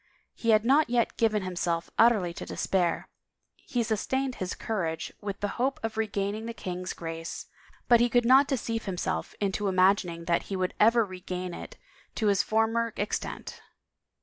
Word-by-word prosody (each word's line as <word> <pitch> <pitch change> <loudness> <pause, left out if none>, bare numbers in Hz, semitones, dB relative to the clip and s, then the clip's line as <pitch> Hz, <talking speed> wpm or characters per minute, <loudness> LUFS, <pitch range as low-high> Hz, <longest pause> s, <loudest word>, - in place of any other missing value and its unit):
He 230 - -3
had 215 0 +5
not 280 +4 +4
yet 240 -1 +1
given 215 -3 +1
him 185 -1 -5
self 170 -1 -1
utterly 215 -7 +4
to - - -7
despair; 180 -3 0 0.6
he 240 -2 0
sustained 255 +4 -1
his 185 - -2
courage 165 -7 -3
with 200 -1 -5
the 205 - +1
hope 270 +2 +1
of 225 0 -3
regaining 215 0 -2
the 230 - -5
king's 180 -2 -4
grace, 165 0 -6 0.4
but 240 -1 +6
he 240 +1 +3
could 245 0 +3
not 265 +3 +6
deceive 230 -4 -2
himself 175 - -3
into 200 0 -1
imagining 185 -3 +2
that 170 0 +1
he 195 - -2
would 185 -1 -1
ever 230 +1 +5
regain 180 -1 -5
it - - -9 0.4
to 220 - -1
his 200 -1 +4
former 225 +1 +1
extent. 205 - -4
205 Hz, 170 wpm, -28 LUFS, 185-230 Hz, 0.6 s, but